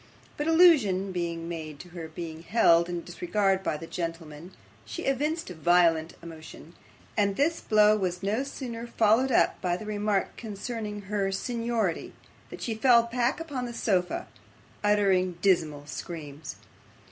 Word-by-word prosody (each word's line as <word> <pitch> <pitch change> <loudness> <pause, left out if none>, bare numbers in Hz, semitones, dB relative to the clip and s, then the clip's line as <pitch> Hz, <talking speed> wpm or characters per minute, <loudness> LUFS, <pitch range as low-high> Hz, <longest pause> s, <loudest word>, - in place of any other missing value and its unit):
But 295 - -3
allusion 270 - +5
being 170 -2 -3
made 160 -3 -6
to 180 - -13
her 170 -2 -7
being 160 0 -7
held 170 -3 +4
in 175 -1 -4
disregard 190 +2 0
by 155 - -2
the 165 - -8
gentlemen, 165 -1 -6 0.3
she 345 - -6
evinced 300 - -1
violent 170 -1 +2
emotion, 160 0 -11 0.4
and 200 -2 +1
this 325 +7 +1
blow 215 0 +5
was 180 -2 -2
no 210 +5 0
sooner 240 -4 -6
followed 230 +3 +3
up - - +2
by 175 -1 0
the 215 - -8
remark 210 -1 -1
concerning 215 -1 -5
her 200 -1 -1
seniority, 230 -3 -2 0.4
than - - -8
she 230 - -3
fell 235 +1 +5
back 240 +4 0
upon 280 -7 -4
the 240 - -7
sofa, 185 -6 0 0.6
uttering 195 -4 +2
dismal 160 -7 +2
screams. 150 0 -7
195 Hz, 145 wpm, -27 LUFS, 170-230 Hz, 0.6 s, allusion